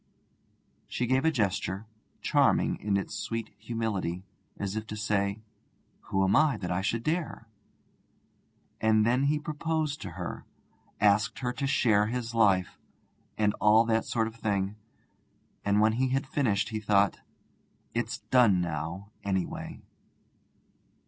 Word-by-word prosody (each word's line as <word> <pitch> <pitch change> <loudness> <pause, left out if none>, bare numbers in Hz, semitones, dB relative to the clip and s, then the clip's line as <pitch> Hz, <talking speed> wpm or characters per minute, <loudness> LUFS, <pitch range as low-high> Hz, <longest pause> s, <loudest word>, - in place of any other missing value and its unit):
She 125 - -2
gave 130 +4 +2
a - - +6
gesture, 100 -4 -1 0.4
charming - - +3
in 100 -1 0
its 100 - -4
sweet 115 -2 -4
humility, 105 -6 -2 0.3
as 100 0 -3
if 110 0 -4
to 105 - -5
say: 100 0 -1 0.6
'Who 95 0 +1
am 95 +2 +3
I 155 -3 +4
that 90 -2 -4
I 90 +1 0
should 115 +4 -1
dare 155 -6 -2 0.7
' - - -40
And 110 -1 +4
then 125 +4 +2
he 150 +2 +2
proposed 155 0 -2
to - - -6
her, - - -5 0.6
asked 105 +4 +3
her 125 -1 -2
to 140 - -2
share 105 -6 +3
his 120 0 -3
life, 95 -7 +2 0.6
and 105 -1 +2
all 110 +2 +6
that 115 -1 +1
sort 115 -2 0
of 110 - -5
thing; 100 -3 -1 0.9
and 100 0 +2
when 110 +1 +4
he 130 +3 +1
had 135 +1 0
finished 125 -8 0
he 110 -1 -3
thought, 100 -1 +2 0.7
'It's 115 -1 -2
done 115 -8 +5
now, 85 +4 -4
anyway.' 95 -2 -3
110 Hz, 140 wpm, -29 LUFS, 100-125 Hz, 0.9 s, a